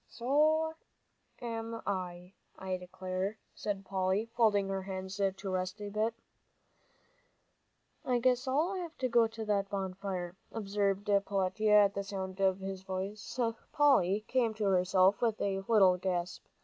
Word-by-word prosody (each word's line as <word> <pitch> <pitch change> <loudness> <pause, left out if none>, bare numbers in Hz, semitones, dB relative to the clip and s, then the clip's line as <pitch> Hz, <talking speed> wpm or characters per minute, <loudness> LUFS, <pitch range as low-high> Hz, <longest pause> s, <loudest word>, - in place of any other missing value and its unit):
"So 310 +6 +2 0.7
am 230 -1 -4
I, 180 -1 -4 0.2
I 190 -1 -3
declare," 185 +2 -4 0.2
said 200 -2 -4
Polly, 190 +2 0
folding 210 -4 +3
her 195 0 -1
hands 190 +1 -5 0.2
to 195 0 -5
rest 185 +2 -2
a 205 -1 -5
bit. 215 +3 0 1.9
"I 250 -1 +1
guess 250 +2 +2
I'll 340 +6 0 0.2
go 235 -1 +5
to 225 0 -7
that 200 -2 0
bonfire," 190 -2 -4 0.2
observed 200 -2 -1
Peletiah. 205 +1 +3
At 200 - -1
the 200 - -2
sound 190 -1 -5
of 190 -1 +3
his 190 -1 -5
voice, 190 +5 -5 0.3
Polly 215 -9 +4
came 235 -4 +1
to 215 - -3
herself 185 0 +3
with 225 -3 +1
a 195 -1 0
little 195 -5 +5
gasp. 180 -1 -3
200 Hz, 135 wpm, -32 LUFS, 190-225 Hz, 1.9 s, go